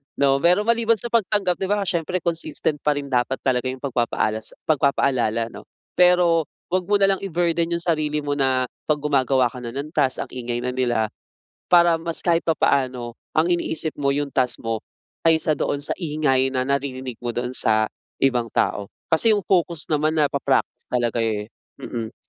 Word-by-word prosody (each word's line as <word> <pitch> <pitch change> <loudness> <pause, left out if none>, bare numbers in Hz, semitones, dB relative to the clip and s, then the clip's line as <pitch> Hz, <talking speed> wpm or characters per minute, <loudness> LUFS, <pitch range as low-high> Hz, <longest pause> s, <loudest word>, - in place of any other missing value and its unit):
'no? 140 -1 +3
Pero 180 +7 +3
maliban 230 0 +3
sa 235 +2 -7
pagtanggap, 205 -5 +1
'di 190 - -1
ba 205 0 +1
siyempre 175 0 -2
consistent 160 -3 -2
pa 150 0 +1
rin 140 -1 -5
dapat 125 +1 +1
talaga 130 -1 +1
yung 130 +1 -5
pagpapaalas 115 -4 -1
pagpapaalala, 130 -6 +1
'no? - - -12 0.2
Pero 175 -3 +4 0.2
huwag 185 0 0
mo 205 - +3
nalang 195 -1 +3
i-burden 170 -3 0
yung 170 - -2
sarili 150 -3 0
mo 145 - -2
na 130 -2 +1 0.2
'pag 150 -1 +1
gumagawa 135 -4 +2
ka 125 - -8
na 120 0 -7
ng 145 +2 -5
task, 140 -5 +1
ang - - -14
ingay 120 -1 -4
na 125 - -1
nila, 120 -4 0 0.6
para 170 -2 +5
mas 165 0 -3
kahit 170 -1 +2
papaano 130 -6 0 0.2
ang 160 +3 +2
iniisip 160 -2 -1
mo 140 -1 +1
yung 145 0 -2
task 130 -2 0
mo 115 -1 -1 0.5
kaysa 160 -1 +3
doon 145 0 -1
sa - - -4
ingay 145 -5 +1
na 130 - +1
naririnig 130 -2 -3
mo 120 -1 -4
doon 125 0 -2
sa 110 -4 +2 0.3
ibang 125 -3 +2
tao. 100 -1 0 0.2
Kasi 215 +7 +4
yung 205 - -1
focus 170 -4 0
naman 155 +1 +1
napa-practice 140 -3 0
talaga 120 -1 -1
eh, 110 -1 -1 0.3
mm, 115 -1 -5
145 Hz, 175 wpm, -22 LUFS, 125-170 Hz, 0.6 s, para